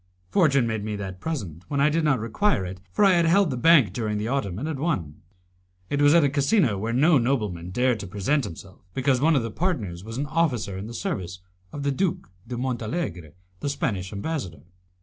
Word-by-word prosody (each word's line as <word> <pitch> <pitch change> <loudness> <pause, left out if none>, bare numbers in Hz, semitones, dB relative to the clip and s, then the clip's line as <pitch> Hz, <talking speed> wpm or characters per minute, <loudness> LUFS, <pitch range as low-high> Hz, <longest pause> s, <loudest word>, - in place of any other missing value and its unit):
Fortune 140 -9 +4
made 110 -2 -2
me 105 0 -3
that 95 -2 -6
present 95 - -5
when 140 - -2
I 145 +2 +4
did 165 +1 +1
not 145 -5 +2
require 115 - 0
it, 90 0 -7
for 210 - +3
I 195 - +6
had 170 -1 +3
held 190 -1 +4
the - - -2
bank 135 - +5
during 105 -1 -2
the 105 +2 -2
autumn, 105 -9 -1
and 140 +8 -3
had 155 -4 -3
won. 95 - -2 0.7
It 145 - +1
was 145 +2 +6
at 170 - +6
a 140 - +3
casino 140 - +2
where 110 +4 -2
no 145 +5 +4
nobleman 105 -9 -1
dared 125 +4 +1
to 100 - -6
present 105 +10 0
himself, 95 -1 -9 0.2
because 130 -1 +2
one 160 +2 +4
of 130 - +2
the 115 - -4
partners 110 - -2
was 115 +2 -7
an 140 - -1
officer 140 - 0
in 95 +3 -6
the 120 - -8
service 90 - -4 0.3
of 145 - -6
the 140 - +1
Duke 170 - -2 0.2
de 120 0 -5
Montalegre, 115 - -3 0.3
the 145 - -2
Spanish 100 -9 -2
Ambassador. 100 - -4
125 Hz, 215 wpm, -25 LUFS, 100-150 Hz, 0.7 s, I